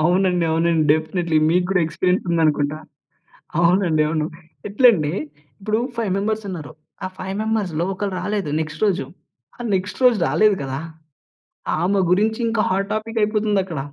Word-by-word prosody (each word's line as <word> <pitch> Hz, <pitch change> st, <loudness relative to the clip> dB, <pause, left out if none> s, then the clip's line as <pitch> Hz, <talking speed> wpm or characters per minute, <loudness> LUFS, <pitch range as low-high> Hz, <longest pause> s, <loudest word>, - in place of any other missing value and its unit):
అవునండి, 180 Hz, +1 st, +2 dB
అవునండి, 165 Hz, 0 st, +2 dB
డెఫినైట్‌లి 160 Hz, +1 st, 0 dB
మీకు 180 Hz, +2 st, +2 dB
గూడా 195 Hz, -, +3 dB
ఎక్స్‌పీరియన్స్ 180 Hz, +3 st, 0 dB
ఉందనుకుంటా. 155 Hz, -3 st, +1 dB, 0.8 s
అవునండి. 170 Hz, -2 st, +3 dB
అవును, 155 Hz, -1 st, -1 dB, 0.4 s
ఎట్లంటే 200 Hz, -, +4 dB, 0.5 s
ఇప్పుడు 215 Hz, +2 st, 0 dB, 0.2 s
5 225 Hz, -4 st, -1 dB
మెంబర్స్ 215 Hz, +2 st, -1 dB
ఉన్నారు, 155 Hz, -8 st, -6 dB, 0.3 s
ఆ -, -, -1 dB
5 190 Hz, +1 st, -4 dB
మెంబర్స్‌లో 200 Hz, -7 st, -1 dB
ఒకరు 195 Hz, +1 st, -3 dB
రాలేదు 205 Hz, -7 st, -2 dB
నెక్స్ట్ 155 Hz, +5 st, -5 dB
రోజు. 200 Hz, -2 st, +1 dB, 0.5 s
ఆ -, -, -19 dB
నెక్స్ట్ 190 Hz, +2 st, -2 dB
రోజు 240 Hz, -4 st, +5 dB
రాలేదు 200 Hz, +7 st, +3 dB
కదా! 135 Hz, 0 st, -4 dB, 1.0 s
ఆమె 195 Hz, +3 st, +2 dB
గురించి 215 Hz, +4 st, +2 dB
ఇంకా 225 Hz, -1 st, +1 dB
హాట్ 195 Hz, +1 st, 0 dB
టాపిక్ 225 Hz, +1 st, -3 dB
అయిపోతుందక్కడ. 205 Hz, -5 st, 0 dB
185 Hz, 140 wpm, -21 LUFS, 165-210 Hz, 1.0 s, రోజు